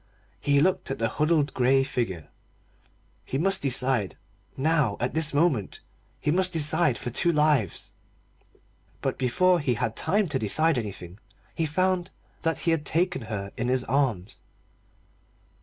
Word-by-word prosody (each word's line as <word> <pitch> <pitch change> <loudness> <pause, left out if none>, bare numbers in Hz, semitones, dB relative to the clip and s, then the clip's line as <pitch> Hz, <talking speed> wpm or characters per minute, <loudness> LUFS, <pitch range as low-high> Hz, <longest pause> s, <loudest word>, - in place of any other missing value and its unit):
He 140 -1 +2
looked 185 +3 +1
at - - -3
the 115 - 0
huddled 150 -1 +1
grey 135 +1 +3
figure. 115 - -3 1.0
He 135 - -4
must 195 +6 +2
decide 130 -6 +1 0.4
now, 145 -6 +1
at 125 - -2
this 160 -1 +1
moment 145 - 0 0.4
he 150 - 0
must 185 +2 +2
decide 160 -4 +2
for 120 +4 -5
two 170 +8 +2
lives. 150 - 0 1.1
But - - -2
before 180 +8 +2
he 130 -5 0
had 110 +1 -2
time 205 0 +1
to 135 -3 -1
decide 155 +7 +2
anything 95 -4 -8 0.3
he 160 - -1
found 185 +3 0 0.3
that 165 -1 -1
he 170 - +1
had 165 -2 0
taken 175 +1 0
her 105 -3 -5
in 120 -1 -3
his 130 0 0
arms. 125 -9 -1
140 Hz, 145 wpm, -26 LUFS, 120-165 Hz, 1.1 s, grey